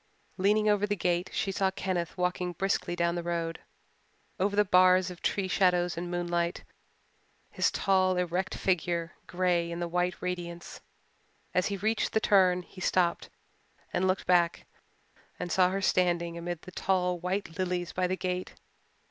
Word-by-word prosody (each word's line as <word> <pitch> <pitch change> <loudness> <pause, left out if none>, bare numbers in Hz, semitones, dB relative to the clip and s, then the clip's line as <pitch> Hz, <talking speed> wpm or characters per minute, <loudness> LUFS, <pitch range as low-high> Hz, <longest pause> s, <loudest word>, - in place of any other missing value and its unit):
Leaning 210 +3 +3
over 205 -1 +3
the 205 - 0
gate 175 -1 0
she 195 - -1
saw 190 0 +1
Kenneth 185 -2 -3
walking 180 0 -1
briskly 190 0 -1
down 170 0 +1
the 175 - -2
road, 170 -1 -3 0.8
over 200 +2 +1
the 210 0 +4
bars 185 0 +5
of 175 - -11
tree 195 -2 0
shadows 180 -2 +2
and 175 +1 -4
moonlight, 175 0 -1 0.9
his - - +2
tall, 185 -2 +2
erect 180 +1 -1
figure 170 -2 0 0.2
grey 175 -2 +1
in 170 0 -5
the 175 - -2
white 180 +1 -1
radiance. 175 -1 -5 0.7
As 180 +1 +2
he 200 - -2
reached 215 +3 0
the 220 - +3
turn 185 -4 +4
he 185 - -13
stopped 175 -2 +1 0.6
and 190 - +1
looked 185 +1 0
back 175 -2 +2 0.7
and 175 - -4
saw 180 0 +4
her 195 +1 -2
standing 175 -2 +1
amid 170 0 -5
the 185 - -10
tall 180 -1 0
white 180 -1 -3
lilies 180 -2 -2
by 185 0 0
the 185 +1 -2
gate. 180 0 -3
180 Hz, 160 wpm, -29 LUFS, 175-190 Hz, 0.9 s, bars